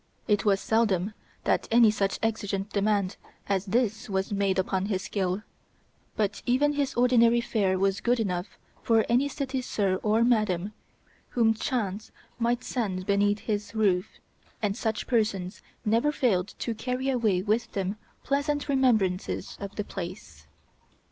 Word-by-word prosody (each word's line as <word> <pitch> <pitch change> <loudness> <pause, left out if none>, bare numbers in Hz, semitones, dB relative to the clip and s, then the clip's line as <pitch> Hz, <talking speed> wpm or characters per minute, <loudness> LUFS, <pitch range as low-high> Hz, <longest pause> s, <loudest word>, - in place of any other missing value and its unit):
It 210 -2 +2
was 200 -2 +3
seldom 210 -3 +1 0.3
that - - +1
any 230 -1 +6
such 195 -2 0
exigeant 205 -3 -1
demand 200 -2 +1 0.3
as 195 0 0
this 225 +2 0
was 190 0 -1
made 195 -1 +1
upon 190 +1 0
his 190 -3 -1
skill, 190 0 -2 0.7
but 210 -1 -1
even 285 +4 +3
his 285 -2 -1
ordinary 240 -1 +5
fare 200 -5 +1
was 195 0 +1
good 245 0 +2
enough 180 -3 -3 0.2
for 225 -1 +3
any 250 +4 +3
city 270 -2 -3
sir 195 -6 0
or 220 +2 +3
madam 215 -5 +1 0.6
whom 225 -2 +5
chance 220 -3 -3 0.3
might 240 +1 +1
send 195 -9 -2
beneath 205 +1 +2
his 210 0 -3
roof, 190 -4 +2 0.5
and 205 -2 -1
such 220 -1 -2
persons 210 -6 -1 0.2
never 230 +7 +3
failed 205 -10 0
to 235 - -2
carry 250 +4 -3
away 220 -8 +1
with 220 +3 0
them 195 +1 -2 0.3
pleasant 285 +1 0
remembrances 225 -10 +1
of 200 0 -6
the 210 - -2
place. 185 0 -8
215 Hz, 145 wpm, -27 LUFS, 195-235 Hz, 0.7 s, any